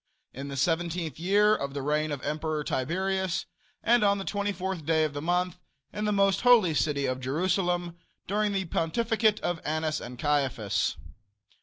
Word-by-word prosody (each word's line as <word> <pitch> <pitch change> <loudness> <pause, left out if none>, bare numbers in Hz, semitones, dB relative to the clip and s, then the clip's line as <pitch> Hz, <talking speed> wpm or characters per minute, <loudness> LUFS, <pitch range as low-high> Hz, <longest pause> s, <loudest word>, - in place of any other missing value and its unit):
In 135 +2 -6
the 140 -1 -5
seventeenth 165 0 -1
year 205 +4 +4
of 140 -4 -4
the 140 - -3
reign 150 +2 0
of 140 -3 -4
Emperor 155 0 -2
Tiberius, 190 +6 -1 0.4
and 235 -1 +4
on 200 0 +4
the 195 - -5
24th 190 -4 -2
day 160 +1 +2
of 155 -2 -1
the 145 - -4
month, 180 +2 0 0.3
in 210 - -2
the 210 - +1
most 195 -1 +2
holy 235 -9 +5
city 145 -2 +1
of 130 0 -1
Jerusalem, 175 +5 0 0.3
during 210 +2 0
the 195 -1 -1
pontificate 215 +6 +1
of 175 -2 -2
Annas 155 0 -1
and 125 0 -8
Caiaphas. 135 -7 0
170 Hz, 165 wpm, -28 LUFS, 150-195 Hz, 0.4 s, holy